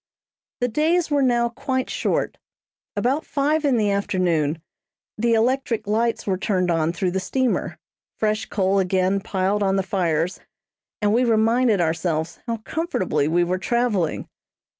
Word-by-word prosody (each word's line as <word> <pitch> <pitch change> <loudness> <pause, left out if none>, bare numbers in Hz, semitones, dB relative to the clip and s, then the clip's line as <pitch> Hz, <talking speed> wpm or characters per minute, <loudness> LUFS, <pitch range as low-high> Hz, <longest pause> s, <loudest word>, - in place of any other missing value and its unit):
The 245 - +2
days 315 +7 +1
were 290 -1 +3
now 240 -2 +2
quite 260 +1 -2
short. - - -1 0.6
About 255 +9 0
five 300 +2 0
in 275 -4 +3
the 210 -2 +2
afternoon 175 -6 0 0.6
the 230 +1 +2
electric 235 -1 0
lights 225 +3 0
were 190 -2 -1
turned 185 -3 0
on 165 -1 +1
through 180 +1 -1
the 190 - -1
steamer, 260 +5 -1 0.4
fresh 215 0 0
coal 195 -1 +1
again 190 +1 +1
piled 195 +1 -1
on 195 -1 +2
the 195 - +1
fires, 175 -2 -1 0.6
and 205 0 +3
we 245 +3 +3
reminded 225 -2 +3
ourselves 165 0 -1
how 230 -1 -1
comfortably 215 - -1
we 175 +3 +2
were 180 +1 -1
traveling. 215 -6 0
210 Hz, 145 wpm, -23 LUFS, 185-240 Hz, 0.6 s, were